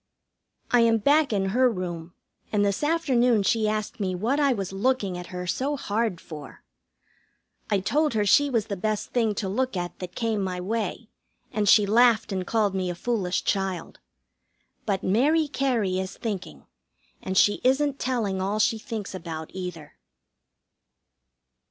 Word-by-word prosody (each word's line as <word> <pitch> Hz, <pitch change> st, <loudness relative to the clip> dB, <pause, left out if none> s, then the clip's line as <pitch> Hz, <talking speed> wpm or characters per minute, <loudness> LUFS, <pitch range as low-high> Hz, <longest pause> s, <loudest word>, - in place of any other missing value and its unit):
I 245 Hz, -, +5 dB
am 230 Hz, -1 st, +4 dB
back 285 Hz, +5 st, +3 dB
in 195 Hz, -2 st, 0 dB
her 250 Hz, +5 st, +3 dB
room, 175 Hz, -4 st, -5 dB, 0.4 s
and 205 Hz, -1 st, +2 dB
this 200 Hz, +7 st, -1 dB
afternoon 250 Hz, -9 st, +2 dB
she 215 Hz, +2 st, +2 dB
asked 215 Hz, +1 st, -3 dB
me 185 Hz, -3 st, -1 dB
what 235 Hz, +10 st, 0 dB
I 285 Hz, -2 st, +3 dB
was 195 Hz, -6 st, -3 dB
looking 205 Hz, -2 st, 0 dB
at 180 Hz, 0 st, -7 dB
her 180 Hz, 0 st, -6 dB
so 275 Hz, +11 st, -1 dB
hard 215 Hz, -5 st, -1 dB
for. 150 Hz, -4 st, -11 dB, 1.1 s
I 200 Hz, -2 st, +1 dB
told 295 Hz, +6 st, +1 dB
her 210 Hz, -1 st, +2 dB
she 285 Hz, +8 st, +5 dB
was 230 Hz, -6 st, 0 dB
the 200 Hz, -, -4 dB
best 215 Hz, +2 st, -2 dB
thing 225 Hz, -4 st, +1 dB
to 200 Hz, -, -2 dB
look 250 Hz, +2 st, -1 dB
at 175 Hz, 0 st, -5 dB
that 180 Hz, -1 st, -7 dB
came 225 Hz, -3 st, -1 dB
my 180 Hz, -1 st, -3 dB
way, 215 Hz, +3 st, -3 dB, 0.4 s
and 210 Hz, -2 st, +1 dB
she 210 Hz, -, +7 dB
laughed 230 Hz, +1 st, +4 dB
and 185 Hz, -2 st, -3 dB
called 215 Hz, -4 st, +1 dB
me 185 Hz, -1 st, -1 dB
a 175 Hz, -, -3 dB
foolish 190 Hz, -3 st, -1 dB
child. 190 Hz, -3 st, -2 dB, 0.9 s
But 195 Hz, -2 st, 0 dB
Mary 295 Hz, +11 st, +3 dB
Cary 235 Hz, -10 st, 0 dB
is 190 Hz, 0 st, -5 dB
thinking, 190 Hz, -, -5 dB, 0.6 s
and 190 Hz, 0 st, -3 dB
she 205 Hz, -, +4 dB
isn't 275 Hz, +2 st, +2 dB
telling 220 Hz, -7 st, -1 dB
all 200 Hz, +3 st, -1 dB
she 220 Hz, +1 st, +2 dB
thinks 215 Hz, -3 st, -6 dB
about, 165 Hz, -3 st, -6 dB
either. 180 Hz, -5 st, -7 dB
210 Hz, 165 wpm, -25 LUFS, 185-240 Hz, 1.1 s, she